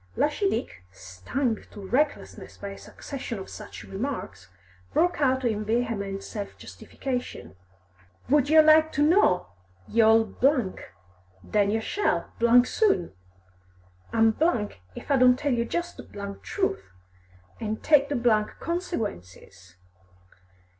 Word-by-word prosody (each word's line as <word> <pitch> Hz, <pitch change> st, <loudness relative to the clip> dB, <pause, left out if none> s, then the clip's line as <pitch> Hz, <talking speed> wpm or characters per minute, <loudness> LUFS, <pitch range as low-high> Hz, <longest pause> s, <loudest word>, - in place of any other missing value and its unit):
Lushy 345 Hz, +7 st, +1 dB
Dick, 95 Hz, -, -4 dB
stung 95 Hz, -, -3 dB
to -, -, -12 dB
recklessness 285 Hz, +7 st, -2 dB
by 200 Hz, -, -6 dB
a 195 Hz, -, -9 dB
succession 260 Hz, -5 st, -7 dB
of 190 Hz, -, -8 dB
such 215 Hz, -, -9 dB
remarks, 195 Hz, -, -5 dB, 0.5 s
broke 350 Hz, -2 st, +2 dB
out 260 Hz, -1 st, +2 dB
in 215 Hz, -2 st, 0 dB
vehement 215 Hz, -3 st, -2 dB
self 205 Hz, -3 st, -7 dB
justification. 245 Hz, -, -6 dB, 0.7 s
"Would 285 Hz, 0 st, +3 dB
yer 315 Hz, 0 st, +7 dB
like 315 Hz, 0 st, +5 dB
to 290 Hz, -, +2 dB
know, 300 Hz, -, +3 dB, 0.4 s
y' 230 Hz, -, +2 dB
old! 225 Hz, 0 st, +3 dB, 1.0 s
Then 205 Hz, -1 st, +1 dB
yer 220 Hz, +2 st, 0 dB
shall, 410 Hz, -, -1 dB, 0.3 s
soon! 250 Hz, -, +1 dB, 1.0 s
I'm 225 Hz, -1 st, +3 dB, 0.6 s
if -, -, -7 dB
I 275 Hz, -, +5 dB
don't 250 Hz, -1 st, +5 dB
tell 285 Hz, -1 st, 0 dB
jist 345 Hz, +7 st, -4 dB
the 200 Hz, -1 st, -8 dB
truth, 385 Hz, -2 st, -2 dB, 0.8 s
an' 215 Hz, -1 st, -2 dB
take 290 Hz, +1 st, +3 dB
the 285 Hz, -, 0 dB, 0.4 s
consequences. 205 Hz, -, -5 dB
235 Hz, 115 wpm, -26 LUFS, 200-295 Hz, 1.0 s, yer